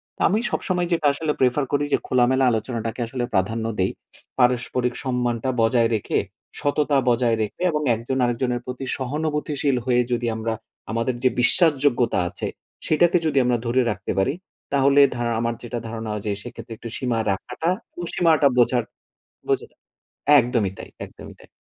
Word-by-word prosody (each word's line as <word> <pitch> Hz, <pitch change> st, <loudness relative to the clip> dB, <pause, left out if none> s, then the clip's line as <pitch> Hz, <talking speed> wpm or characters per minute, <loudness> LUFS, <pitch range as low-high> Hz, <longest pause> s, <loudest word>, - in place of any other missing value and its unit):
তো -, -, -10 dB
আমি 210 Hz, -, +2 dB
সবসময় 180 Hz, -2 st, -1 dB
যেইটা 165 Hz, -3 st, +2 dB
আসলে 150 Hz, +1 st, -1 dB
prefer 130 Hz, +3 st, +3 dB
করি 145 Hz, 0 st, +1 dB
যে -, -, +5 dB
খোলামেলা 130 Hz, +1 st, +3 dB
আলোচনাটাকে 115 Hz, +1 st, -3 dB
আসলে 125 Hz, 0 st, -3 dB
প্রাধান্য 110 Hz, +4 st, 0 dB
দেই। 95 Hz, -, +2 dB, 0.5 s
পারস্পরিক 125 Hz, 0 st, +1 dB
সম্মানটা 125 Hz, -1 st, -1 dB
বজায় 115 Hz, 0 st, +3 dB
রেখে, 105 Hz, -, 0 dB, 0.4 s
সততা 145 Hz, 0 st, +1 dB
বজায় 120 Hz, -1 st, +2 dB
রেখে 110 Hz, +10 st, -4 dB
এবং 150 Hz, 0 st, -1 dB
একজন 120 Hz, +4 st, -3 dB
আরেকজনের 120 Hz, 0 st, -1 dB
প্রতি 125 Hz, +1 st, -5 dB
সহানুভূতিশীল 150 Hz, 0 st, -1 dB
হয়ে 125 Hz, -1 st, +3 dB
যদি 120 Hz, 0 st, 0 dB
আমরা 110 Hz, 0 st, -2 dB, 0.4 s
আমাদের 115 Hz, +2 st, -1 dB
যে 130 Hz, -, +5 dB
বিশ্বাসযোগ্যতা 130 Hz, -, +3 dB
আছে, -, -, -4 dB, 0.4 s
সেইটাকে 175 Hz, +3 st, +4 dB
যদি 155 Hz, -3 st, 0 dB
আমরা 125 Hz, -1 st, +2 dB
ধরে 125 Hz, +2 st, +2 dB
রাখতে 95 Hz, -1 st, -4 dB
পারি, 95 Hz, -, +2 dB, 0.4 s
তাহলে 140 Hz, +1 st, +5 dB
ধা 120 Hz, -, -2 dB, 0.2 s
আমার 115 Hz, 0 st, 0 dB
যেটা 120 Hz, 0 st, -4 dB
ধারণা 110 Hz, -1 st, -5 dB
ওইযে 105 Hz, 0 st, -3 dB
সেইক্ষেত্রে 120 Hz, -1 st, -9 dB
একটু 115 Hz, -, -8 dB
সীমা 125 Hz, -3 st, -1 dB
রাখাটা 125 Hz, -, -3 dB, 0.3 s
ও -, -, -3 dB
সীমাটা 160 Hz, -4 st, +4 dB
বোঝার 120 Hz, 0 st, +3 dB, 0.6 s
বোঝা -, -, 0 dB, 0.7 s
একদমই 120 Hz, -6 st, +1 dB
তাই, -, -, -9 dB
একদমই -, -, -12 dB
তাই। -, -, -17 dB
125 Hz, 155 wpm, -23 LUFS, 115-140 Hz, 0.7 s, যে